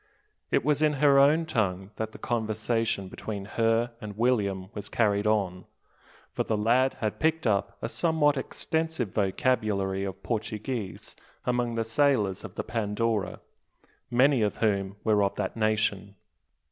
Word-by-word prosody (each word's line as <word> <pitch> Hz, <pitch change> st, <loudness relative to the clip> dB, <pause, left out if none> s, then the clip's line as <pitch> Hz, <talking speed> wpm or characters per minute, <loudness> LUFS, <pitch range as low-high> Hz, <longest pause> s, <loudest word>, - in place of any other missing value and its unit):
It -, -, +1 dB
was 150 Hz, 0 st, +2 dB
in 155 Hz, -1 st, +4 dB
her 140 Hz, -1 st, +5 dB
own 150 Hz, +4 st, +5 dB
tongue 95 Hz, -, -1 dB
that 110 Hz, 0 st, -3 dB
the -, -, -11 dB
conversation 110 Hz, -2 st, -1 dB
between 100 Hz, +1 st, -6 dB
her 115 Hz, +3 st, +1 dB
and 105 Hz, -2 st, -7 dB
William 100 Hz, -6 st, 0 dB
was 105 Hz, -1 st, -6 dB
carried 105 Hz, -2 st, +1 dB
on: 95 Hz, -4 st, 0 dB, 0.7 s
for -, -, -1 dB
the 110 Hz, -, -1 dB
lad 120 Hz, +5 st, +3 dB
had 110 Hz, -2 st, -2 dB
picked 160 Hz, -1 st, +1 dB
up 100 Hz, -2 st, 0 dB
a -, -, 0 dB
somewhat 150 Hz, +2 st, +2 dB
extensive 160 Hz, -, -2 dB
vocabulary 100 Hz, -2 st, 0 dB
of 95 Hz, 0 st, -6 dB
Portuguese 110 Hz, -1 st, -4 dB, 0.3 s
among 120 Hz, -1 st, 0 dB
the 115 Hz, -, 0 dB
sailors 110 Hz, -5 st, +1 dB
of 105 Hz, -5 st, -9 dB
the -, -, -3 dB
Pandora 110 Hz, -1 st, -1 dB, 0.7 s
many 130 Hz, +1 st, +4 dB
of 105 Hz, -1 st, 0 dB
whom 100 Hz, -3 st, 0 dB
were 105 Hz, -2 st, +3 dB
of 100 Hz, -1 st, +1 dB
that 95 Hz, -2 st, -3 dB
nation. 110 Hz, -2 st, 0 dB
110 Hz, 145 wpm, -27 LUFS, 100-125 Hz, 0.7 s, her